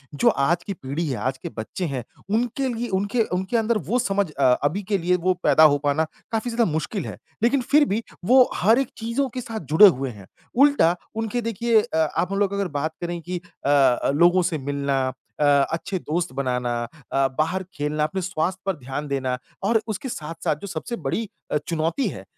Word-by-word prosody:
जो 140 - +4
आज 160 +5 +1
की 200 - -4
पीढ़ी 155 +1 -4
है, 130 -4 -2
आज 130 +1 -2
के - - -7
बच्चे 110 +11 -4
हैं, 135 -6 -3 0.3
उनके 240 +5 0
लिए, 235 +1 -3
उनके 205 +4 +1
उनके 190 +6 -1
अंदर 225 0 +2
वो 245 +3 +2
समझ 200 -6 0
अ, 140 - -2 0.2
अभी 165 +8 0
के 200 +1 0
लिए 180 0 +1
वो 185 - +5
पैदा 160 - +5
हो - - +2
पाना 145 +2 +2 0.3
काफ़ी 225 +2 -1
ज़्यादा 230 -6 +1
मुश्किल 160 +6 -2
है। - - -7 0.3
लेकिन 260 +3 +3
फिर 290 +4 +4
भी 230 - -2 0.2
वो 255 +4 +6
हर 225 +6 +4
एक 270 - -1
चीज़ों 235 +5 -1
के 255 +1 -5
साथ 225 -2 -5
जुड़े 205 +6 +10
हुए 135 -5 +1
हैं, 100 -5 -11 0.3
उल्टा 275 - +5 0.2
उनके 225 +2 -1
देखिए 230 0 +2
अ, 160 - -4
आप 160 +4 0
हम 195 - 0
लोग 200 -1 +1
अगर 200 -1 0
बात 160 +2 -2
करें 175 0 -3
कि 180 +1 -5 0.2
अ, 135 -4 +4
लोगों 175 +4 +5
से 160 - -1
मिलना 140 -2 -1 0.3
अ 150 - +3 0.3
अच्छे 185 +3 -2
दोस्त 170 +1 -2
बनाना 125 -2 -1 0.4
अ, 135 0 +3
बाहर 170 +5 0
खेलना, 150 +1 -1
अपने 175 +5 -1
स्वास्थ्य 180 0 -2
पर 195 -2 0
ध्यान 135 +2 -5
देना 130 -2 -1 0.3
और 220 +2 +3
उसके 220 +5 -4
साथ-साथ 160 -5 -3
जो 200 - -6
सबसे 185 +6 -4
बड़ी 195 +6 -3 0.4
चुनौती 165 - 0
है 95 - -8
180 Hz, 200 wpm, -23 LUFS, 145-220 Hz, 0.4 s, जुड़े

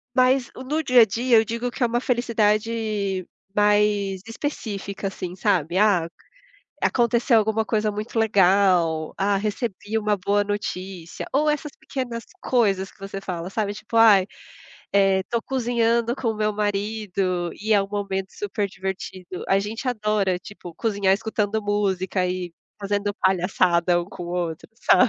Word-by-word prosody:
Mas 255 0 +3
no 295 +5 -2
dia 250 -3 +6
a 225 - +8
dia 235 +3 +2
eu 220 - +5
digo 235 +2 -3
que - - -10
é - - +5
uma 240 +1 0
felicidade 215 -5 0 0.3
mais 205 -2 +2
específica, 210 -6 -4
assim, 180 -2 -6
sabe? 180 -4 +1
Ah, 195 -5 +3 0.7
aconteceu 235 0 +3
alguma 220 0 +1
coisa 215 -1 0
muito 210 +3 -6
legal. 190 -6 +3
Ah, 200 +1 +2
recebi 215 +1 -2
uma 210 -1 +1
boa 200 +2 +1
notícia 190 -4 -5
ou 300 +3 +3
essas 300 0 -3
pequenas 245 -4 -5 0.2
coisas 200 -6 +1
que - - -26
você 195 0 -6
fala, 180 -2 -5
sabe? 205 0 -1
Tipo 215 +2 -6
ai, 210 -4 +7 0.7
eh, 195 -1 +4
tô 235 -1 +1
cozinhando 235 -2 +1
com 250 - -2
o - - -3
meu 215 0 0
marido 200 -4 -1
e 215 +2 -1
é 205 - +5
um 195 - -3
momento 195 -2 -3
super 205 0 -2
divertido. 190 -1 -6
A 195 +1 +4
gente 220 +6 -5
adora 210 -6 0
tipo 175 -3 -11
cozinhar, 200 -3 +1
escutando 215 0 -1
música 190 -2 0
e 180 -1 -3 0.3
fazendo 205 0 -1
palhaçada 180 -2 +2
um - - -7
com 180 -1 -9
o - - -7
outro, 170 -3 -3
sabe? 245 +1 +4
205 Hz, 155 wpm, -23 LUFS, 190-225 Hz, 0.7 s, a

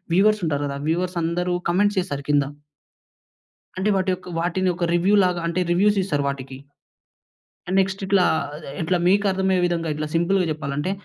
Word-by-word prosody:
Viewers 210 +2 +4
ఉంటారు 145 -2 -1
కదా! 140 0 -4
Viewers 180 +2 -1
అందరు 175 +2 -1
కామెంట్ 205 +4 +2
చేస్తారు 140 -6 -4
కింద. 145 -1 +4 1.4
అంటే 195 +3 +1
వాటి 190 0 0
యొక్క 185 0 -6
వాటిని 180 +2 0
ఒక 175 - -1
రివ్యూలాగా 180 0 +3
అంటే 170 +2 -1
రివ్యూస్ 205 +3 +3
ఇస్తారు 145 -7 -1
వాటికి. 135 -1 -6 1.2
నెక్స్ట్ 190 +1 0
ఇట్లా, 190 -2 +3 0.6
ఇట్లా 175 +3 +1
మీకు 200 +3 +3
అర్థమయ్యే 190 -1 +1
విధంగా 165 -2 -2
ఇట్లా 155 0 -3
సింపుల్‌గా 180 +2 +2
జెప్పాలంటే 145 +2 -3
180 Hz, 145 wpm, -22 LUFS, 160-190 Hz, 1.4 s, Viewers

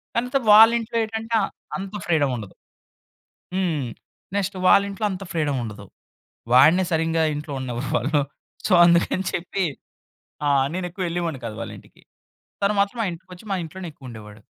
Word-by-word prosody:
కానితే 250 +3 +1
వాళ్ళ 220 +2 +9
ఇంట్లో 230 +1 -4
ఏటంటే, 225 +1 -3
ఆహ్, 195 - -2 0.3
అంత 195 +1 -7
ఫ్రీడమ్ 145 -6 +2
ఉండదు. 105 -4 -9 1.0
హ్మ్. 170 -7 0 0.5
నెక్స్ట్ 200 0 -1
వాళ్ళ 200 - +7
ఇంట్లో 200 +2 -3
అంత 190 +1 -5
ఫ్రీడమ్ 150 -4 0
ఉండదు. 105 -2 -8 0.7
వాడినే 155 +9 +6
సరింగా 165 0 +1
ఇంట్లో 150 0 -6
ఉండనివ్వరు 125 0 -4
వాళ్ళు. 145 +5 +1 0.5
సో, - - -4
అందుకని 170 +2 +3
చెప్పి 180 +3 -2 0.8
ఆ! - - +3 0.3
నేనెక్కువెళ్ళేవాడిని 175 -4 -3
కాదు 110 -2 -6
వాళ్ళింటికి. - - -10 0.6
తను 200 +1 +2
మాత్రం 200 +4 +1
మా 225 - +1
ఇంటికొచ్చి, 180 +2 -11
మా 195 - +1
ఇంట్లోనే 175 +2 -7
ఎక్కువుండేవాడు. 110 -6 -11
175 Hz, 140 wpm, -23 LUFS, 145-195 Hz, 1.0 s, వాళ్ళ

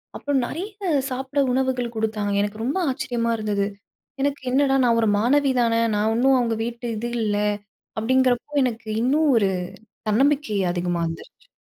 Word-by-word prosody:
அப்புறம் 285 -3 0
நிறைய 360 +10 -5 0.4
சாப்பிட 265 +2 -2
உணவுகள் 255 -2 0
குடுத்தாங்க. 215 -2 -1
எனக்கு 205 +2 -3
ரொம்ப 270 +9 -1
ஆச்சரியமா 240 -2 -2
இருந்தது. 205 -2 -1 0.5
எனக்கு 285 0 0
என்னடா! 270 +1 +3
நான் 230 -1 +3
ஒரு 220 - +2
மாணவி 275 +5 +3
தானே! 230 -1 +2 0.2
நான் 210 +1 +1
இன்னும் 265 +3 +4
அவுங்க 230 -2 0
வீட்டு 235 +1 -5
இது 235 +3 -3
இல்ல, 210 -1 0 0.6
அப்பிடிங்கிறப்போ, 255 +3 +1
எனக்கு 230 -3 -3
இன்னும் 295 +5 +2
ஒரு 200 -3 +2 0.6
தன்னம்பிக்கை 270 0 +2
அதிகமா 175 -1 -1
வந்துருச்சு. 165 - -9
240 Hz, 145 wpm, -23 LUFS, 215-265 Hz, 0.6 s, இன்னும்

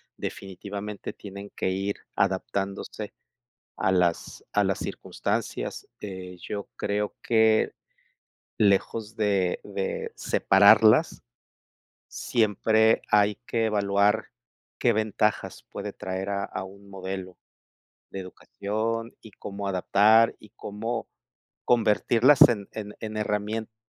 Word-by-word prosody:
definitivamente 100 +2 -6
tienen 100 0 -10
que - - -1
ir 100 +2 -2 0.2
adaptándose 100 +1 -2 0.6
a 95 - +1
las 90 -2 0
a 105 - +3
las 95 -1 0
circunstancias. - - -3
Eh, 95 -2 -7
yo 100 -1 -5
creo 105 0 -2
que, 110 -1 +3 0.8
lejos 105 +2 +1
de 100 -5 +1
de 100 -1 -4
separarlas, 110 +3 +5 0.9
siempre 110 0 +2
hay 105 -1 +4
que 115 -2 0
evaluar 100 0 +2 0.5
qué - - +3
ventajas 105 0 -1
puede - - -5
traer 95 +1 -4
a 100 0 -1
a 95 - -5
un 100 +1 -13
modelo 95 -1 -6 0.7
de 95 - -5
educación 110 +5 -4
y 110 - -12
cómo 100 +1 -6
adaptar, 105 +4 +4
y 105 - -16
cómo 115 +3 -4 0.6
convertirlas 120 +4 +5
en 105 -4 -2
en 105 -1 -6
en 110 -1 -5
herramientas. 105 +1 -2
105 Hz, 105 wpm, -26 LUFS, 100-110 Hz, 0.9 s, separarlas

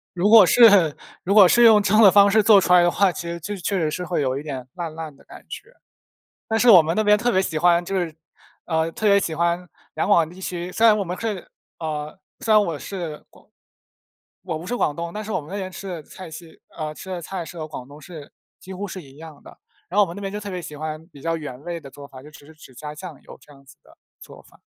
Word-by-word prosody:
如 185 +4 +1
果 220 -3 +9
是 200 -7 +5 0.3
如 195 - 0
果 200 -3 +8
是 240 +6 +4
用 220 -3 +7
这 205 +1 -1
样 220 - +6
的 200 -4 +8
方 200 0 +6
式 220 +1 +4
做 210 -1 +6
出 180 -1 +2
来 180 - +7
的 175 - +3
话， 195 +1 +2
其 - - -7
实 170 - -5
就 205 +5 -6
确 190 +1 -2
实 155 -2 -1
是 180 +3 -4
会 175 - -2
有 130 -1 -1
一 145 - -6
点 130 -4 -7
烂 170 -3 -6
烂 160 -3 -8
的 - - -22
感 - - -14
觉。 - - -10 0.8
但 225 - 0
是 245 +2 +3
我 180 -6 +9
们 160 +2 -2
那 215 - +1
边 210 0 +5
特 240 +3 0
别 190 - +2
喜 170 -5 -2
欢 175 +1 +3
就 195 +2 -5
是 165 -3 -3 0.5
呃， 160 -1 -1
特 220 - -3
别 200 0 +5
喜 165 -4 -3
欢 170 +2 -1 0.3
两 - - -2
广 170 -6 +4
地 180 +2 -14
区 180 -1 -5
虽 225 - 0
然 215 - +6
我 200 - -1
们 180 +1 -5
是 215 -5 -4 0.3
呃， 155 +1 -5 0.2
虽 225 - 0
然 215 - +6
我 165 -4 -3
是 170 -6 -7
广 - - -22 1.0
我 170 -4 -4
不 165 - -10
是 245 - -2
广 145 - 0
东， 170 +1 -5
但 215 +1 -5
是 215 - -7
我 - - -1
们 150 - -14
那 200 - -5
边 190 -2 -5
吃 195 +2 -9
的 170 -5 -6
菜 185 +2 -11
系 160 0 -12 0.2
呃， 155 -1 -4
吃 190 - -11
的 180 -2 -5
菜 180 +1 -6
是 175 - -11
和 155 -1 -6
广 130 -4 -9
东 145 +2 -14
是 155 -2 -11 0.3
几 190 - -10
乎 200 +2 -5
是 185 - -8
一 135 -3 -17
样 155 -2 -12
的。 - - -15 0.3
然 190 - -4
后 - - +7
我 - - -2
们 170 - -8
那 - - -7
边 195 -1 -4
就 210 - -4
特 205 -1 -7
别 180 -2 -5
喜 150 - -9
欢 155 +1 -6
比 145 -6 -16
较 165 +2 -2
原 140 -4 -8
味 170 0 -5
的 140 - -12
做 140 +1 -12
法， 130 -2 -13
就 150 - -13
只 145 - -16
是 160 - -16
只 135 -4 -16
加 150 +3 -8
酱 165 -2 -10
油 - - -14
这 145 - -18
样 140 - -19
子 135 - -18
的 - - -22 0.2
做 - - -14
法。 - - -24
175 Hz, 305 characters per minute, -22 LUFS, 155-195 Hz, 1.0 s, 果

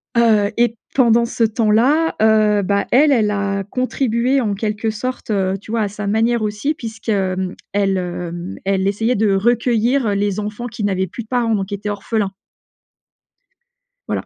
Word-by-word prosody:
heu 215 -3 +3
et 235 -1 +2 0.2
pendant 235 -3 +4
ce 230 0 -1
temps-là, 230 +8 +2
heu, 215 -2 +4
bah 200 +1 0
elle, 290 +4 +5
elle 220 -6 +3
a 200 -1 -1
contribué 255 +1 0
en 210 -4 -1
quelque 215 +2 -2
sorte, 250 +4 -5
heu, 195 -2 0
tu 215 - -10
vois 230 -1 0
à 205 - +1
sa 205 0 -6
manière 225 +3 +1
aussi 215 +8 -1
puisque, 225 -5 -8
hem, 190 -2 -1 0.2
elle 195 -1 +1
hem, 175 -1 -5
elle 195 0 +1
essayait 225 +5 0
de 205 -1 +2
recueillir 235 +3 +2
heu, 205 - +1
les 205 0 0
enfants 210 +3 -4
qui 220 -2 -6
n'avaient 190 -2 0
plus 235 +7 -7
de 215 - -22
parents 235 -2 0
donc 195 -2 -2
qui 200 - -4
étaient 205 +1 -5
orphelins. 205 0 -2 1.8
Voilà. - - -2
215 Hz, 175 wpm, -19 LUFS, 200-235 Hz, 1.8 s, elle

